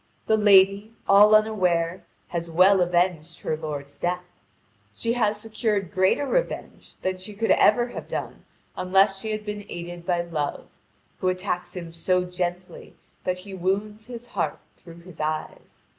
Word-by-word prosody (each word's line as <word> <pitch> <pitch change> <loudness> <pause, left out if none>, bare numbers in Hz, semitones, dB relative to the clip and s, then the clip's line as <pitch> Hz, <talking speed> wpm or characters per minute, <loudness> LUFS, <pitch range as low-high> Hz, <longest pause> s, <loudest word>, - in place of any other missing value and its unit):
The 220 - +3
lady, 200 +1 +5
all 210 +2 +7
unaware, 185 -5 +1 0.2
has 170 -1 -4
well 185 +3 +5
avenged 175 -2 0
her 155 - -1
lord's 145 -3 -6
death. 180 +1 -1 0.7
She 230 - -1
has 215 -3 +1
secured 215 -4 -2
greater 190 +9 +2
revenge - - -3
than 185 0 -1
she 200 +3 -9
could 225 +2 +1
ever 240 +3 +4
have - - -7
done - - -5 0.3
unless 195 +1 +3
she 220 - -5
had 215 0 -3
been 210 -1 -5
aided 175 0 -7
by 175 0 0
Love, 155 -4 -3 0.5
who 185 - -1
attacks 185 -1 -2
him 170 -2 -7
so 180 +2 +1
gently 180 0 -5 0.3
that 180 0 0
he 200 - -9
wounds 205 +4 -2
his 240 -1 -8
heart 175 -10 -2 0.2
through 170 -1 -14
his 175 -1 -13
eyes. 155 0 -5
185 Hz, 155 wpm, -25 LUFS, 175-210 Hz, 0.7 s, all